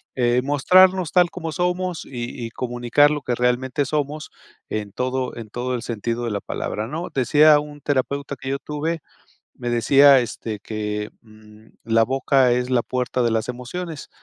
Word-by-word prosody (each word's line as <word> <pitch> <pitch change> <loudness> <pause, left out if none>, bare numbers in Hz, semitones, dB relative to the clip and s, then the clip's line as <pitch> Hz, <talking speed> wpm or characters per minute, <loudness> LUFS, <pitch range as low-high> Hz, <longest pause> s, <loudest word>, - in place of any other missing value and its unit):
eh, 125 -1 +2
mostrarnos 180 +5 +4
tal 180 -2 +5
como 165 -3 -5
somos 180 0 -1
y 120 -1 -6
y 115 - -5
comunicar 120 +4 +2
lo 150 -1 -2
que 125 -1 -2
realmente 125 +3 0
somos 150 +2 -3 0.4
en 105 -2 -4
todo 130 +3 -2
en 110 -2 -8
todo 125 +3 -3
el 120 - -4
sentido 115 +1 -3
de 115 - -2
la 100 - -2
palabra, 105 +1 -4
¿no? 165 +6 -4
Decía 150 +4 +5
un 145 0 -10
terapeuta 140 0 -2
que 135 0 -7
yo 140 - 0
tuve, 155 +4 -3 0.5
me 120 -1 -5
decía, 135 +4 +6
este, 110 -2 -5
que, 105 -1 -4
mm: 110 -1 -18 0.2
"La 115 0 +3
boca 135 0 +2
es 125 +1 -1
la 125 -2 +2
puerta 125 0 -2
de 115 - +1
las 110 +1 -1
emociones". 145 +6 -6
125 Hz, 175 wpm, -22 LUFS, 120-145 Hz, 0.5 s, decía